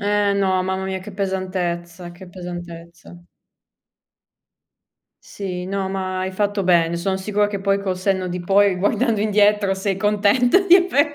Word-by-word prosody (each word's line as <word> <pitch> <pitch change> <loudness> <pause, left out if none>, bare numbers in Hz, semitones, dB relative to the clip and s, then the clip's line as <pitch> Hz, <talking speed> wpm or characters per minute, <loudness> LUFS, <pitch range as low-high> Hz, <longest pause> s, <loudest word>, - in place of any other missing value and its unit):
Eh 205 0 +1
no, 190 -2 +1
mamma 190 +1 -3
mia 190 0 -3
che 200 +3 -10
pesantezza, 185 -3 -4
che 180 +1 -13
pesantezza. 175 -1 -10 2.0
Sì, 180 -3 -6
no 195 0 -3
ma 190 -1 -3
hai 185 0 -3
fatto 205 0 -1
bene. 170 -2 +2
Son 190 +3 -1
sicura 205 +2 0
che 205 -1 -5
poi, 195 0 +1
col 190 -2 -2
senno 185 0 -1
di 180 0 -4
poi, 195 +2 +3
guardando 210 +4 0
indietro 210 -1 +2
sei 195 0 -2
contenta 210 - +3
di 385 -2 +5
aver 325 -5 +2
190 Hz, 150 wpm, -21 LUFS, 180-205 Hz, 2.0 s, di